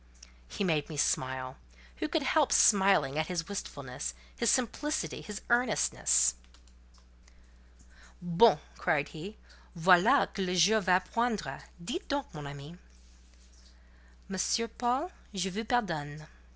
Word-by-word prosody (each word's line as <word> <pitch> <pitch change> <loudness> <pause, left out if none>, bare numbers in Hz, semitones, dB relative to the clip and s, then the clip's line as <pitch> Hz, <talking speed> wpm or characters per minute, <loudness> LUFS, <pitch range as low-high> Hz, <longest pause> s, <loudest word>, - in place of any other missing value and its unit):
'" - - -28
He - - 0
made 160 -5 0
me 155 - -7
smile. 130 -2 -1 0.4
Who - - -2
could - - -1
help - - +2
smiling 190 -8 +4
at 155 - -1
his 175 -3 -3
wistfulness, 135 - -6 0.2
his - - +1
simplicity, 295 +5 -1
his 210 -1 -8
earnestness? 65 - +3 1.9
"Bon!" 175 +2 +4
he - - -23
cried. 155 -5 0 0.7
"Voilà 185 - +4
que 195 - -2
le 180 0 -1
jour 205 +5 +4
va 185 -1 +3
poindre! 215 - -2 0.2
Dites 355 - -4
donc, 285 -2 -3
mon 150 -2 -7
ami." 140 +3 -9 1.5
"Monsieur 195 +4 0
Paul, 250 - -2 0.2
je 190 0 -1
vous 220 +5 -4
pardonne." 155 - -2
180 Hz, 125 wpm, -30 LUFS, 145-225 Hz, 1.9 s, smiling